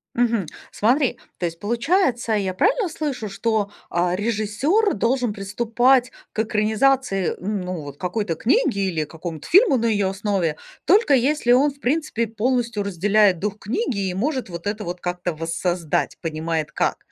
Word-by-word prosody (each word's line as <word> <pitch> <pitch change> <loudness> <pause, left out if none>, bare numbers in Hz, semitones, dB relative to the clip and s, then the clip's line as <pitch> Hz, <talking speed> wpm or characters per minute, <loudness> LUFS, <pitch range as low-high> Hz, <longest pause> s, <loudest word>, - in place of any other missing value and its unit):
Мгм, 235 -5 +1 0.3
смотри, 250 +5 +2 0.2
то 180 - -2
есть, 165 -1 -4
получается, 240 - +1
я 195 -3 0
правильно 410 - +2
слышу, 280 -9 -4
что, 205 0 -1 0.2
а, 175 +1 +1
режиссёр 230 - +1
должен 235 +2 0
приступать 235 +5 +2 0.2
к - - -5
экранизации, 220 -1 +1
ну, 185 -4 -3
вот 145 -1 -9
какой-то 180 0 -2
книги 255 - +1
или 160 -4 -1
к - - -23
какому-то 160 -2 -7
фильму 385 - +5
на 235 - -1
её 205 -4 +2
основе, 190 -5 -1 0.3
только 385 -2 +4
если 265 -1 +3
он, 280 +4 +4
в 280 - -19
принципе, 275 -4 0
полностью 230 -1 -1
разделяет 200 0 +3
дух 205 +2 -3
книги 210 - -2
и - - -3
может 255 +3 -2
вот 170 +2 -6
это 210 +1 -2
вот 175 -1 -5
как-то 180 0 -3
воссоздать, 165 +1 -2
понимает 160 -2 -3
как. - - 0
210 Hz, 155 wpm, -22 LUFS, 180-250 Hz, 0.3 s, фильму